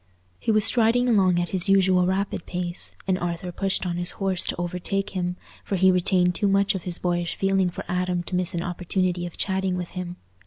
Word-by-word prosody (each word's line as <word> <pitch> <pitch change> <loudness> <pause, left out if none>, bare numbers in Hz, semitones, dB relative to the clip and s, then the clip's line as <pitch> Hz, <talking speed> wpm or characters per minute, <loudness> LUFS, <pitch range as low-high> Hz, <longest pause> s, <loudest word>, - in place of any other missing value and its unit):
He - - 0
was 215 -1 +4
striding 235 +2 +3
along 190 -6 +3
at 175 - -1
his 190 +1 0
usual 185 -2 +4
rapid 190 -1 -2
pace, 175 -1 -4
and 190 -1 0
Arthur 175 +1 -3
pushed 195 +1 -1
on 175 -1 -2
his 175 0 +1
horse 190 -2 0
to - - 0
overtake 180 +3 -2
him, 180 -2 -2 0.3
for 200 - -2
he 190 0 +5
retained 180 0 +3
too 205 - 0
much 200 +1 +3
of 190 -3 -5
his 180 -1 -2
boyish 175 -1 -1
feeling 195 -1 +1
for 175 - -7
Adam 180 -1 -1
to 180 - -4
miss 180 -1 +1
an 170 - -1
opportunity 180 0 -1
of 175 - -11
chatting 190 -1 0
with 180 -1 -4
him. 180 -1 -6
180 Hz, 210 wpm, -24 LUFS, 175-195 Hz, 0.3 s, he